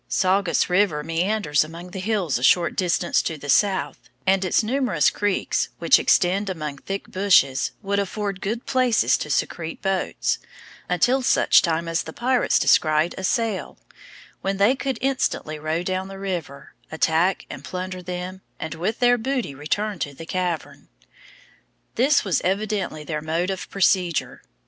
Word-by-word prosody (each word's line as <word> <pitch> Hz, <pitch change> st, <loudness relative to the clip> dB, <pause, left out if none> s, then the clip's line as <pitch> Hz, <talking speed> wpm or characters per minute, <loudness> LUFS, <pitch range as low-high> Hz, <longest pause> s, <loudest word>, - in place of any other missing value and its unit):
Saugus 190 Hz, +2 st, +2 dB
river 180 Hz, -5 st, +2 dB
meanders 165 Hz, -2 st, +1 dB
among 170 Hz, +3 st, -10 dB
the 190 Hz, -, -6 dB
hills 185 Hz, -, 0 dB
a -, -, -7 dB
short 170 Hz, +5 st, +4 dB
distance 175 Hz, -1 st, +1 dB
to 160 Hz, -, -4 dB
the 145 Hz, 0 st, -9 dB
south, 190 Hz, -4 st, +2 dB, 0.3 s
and 190 Hz, 0 st, +3 dB
its 185 Hz, +4 st, +2 dB
numerous 225 Hz, -, +1 dB
creeks 205 Hz, -1 st, -1 dB
which -, -, +5 dB
extend 195 Hz, +3 st, +2 dB
among 150 Hz, -6 st, -5 dB
thick 195 Hz, +5 st, -5 dB
bushes, 185 Hz, -9 st, +2 dB
would 200 Hz, +1 st, 0 dB
afford 200 Hz, -1 st, -3 dB
good 225 Hz, +4 st, -3 dB
places 240 Hz, -, +2 dB
to 150 Hz, -, -5 dB
secrete 160 Hz, +3 st, -2 dB
boats, 195 Hz, -1 st, -1 dB, 0.5 s
until 265 Hz, +2 st, +2 dB
such 255 Hz, -, +4 dB
time 165 Hz, -1 st, -1 dB
as 165 Hz, 0 st, 0 dB
the -, -, -8 dB
pirates 250 Hz, +1 st, +2 dB
descried 155 Hz, +2 st, +3 dB
a 190 Hz, -, -7 dB
sail, 220 Hz, 0 st, -1 dB, 0.6 s
when 195 Hz, 0 st, -1 dB
they 205 Hz, +7 st, +4 dB
could 270 Hz, 0 st, -3 dB
instantly 255 Hz, -, -1 dB
row 155 Hz, +3 st, -2 dB
down 185 Hz, +1 st, -2 dB
the 195 Hz, 0 st, -9 dB
river, 175 Hz, -8 st, -5 dB, 0.2 s
attack 160 Hz, +3 st, +1 dB
and -, -, -9 dB
plunder 185 Hz, 0 st, -5 dB
them, 180 Hz, +1 st, -6 dB, 0.2 s
and 160 Hz, -, -4 dB
with 180 Hz, +8 st, -2 dB
their 245 Hz, -1 st, +3 dB
booty 255 Hz, -, -2 dB
return 190 Hz, +8 st, -2 dB
to 145 Hz, -2 st, -4 dB
the 165 Hz, -, -9 dB
cavern. 180 Hz, -2 st, -3 dB, 1.1 s
This 275 Hz, +2 st, +3 dB
was 180 Hz, -7 st, +1 dB
evidently 195 Hz, -4 st, -2 dB
their 150 Hz, -1 st, -4 dB
mode 165 Hz, +4 st, -1 dB
of 190 Hz, -, -6 dB
procedure. 185 Hz, -3 st, +1 dB
185 Hz, 155 wpm, -23 LUFS, 160-205 Hz, 1.1 s, which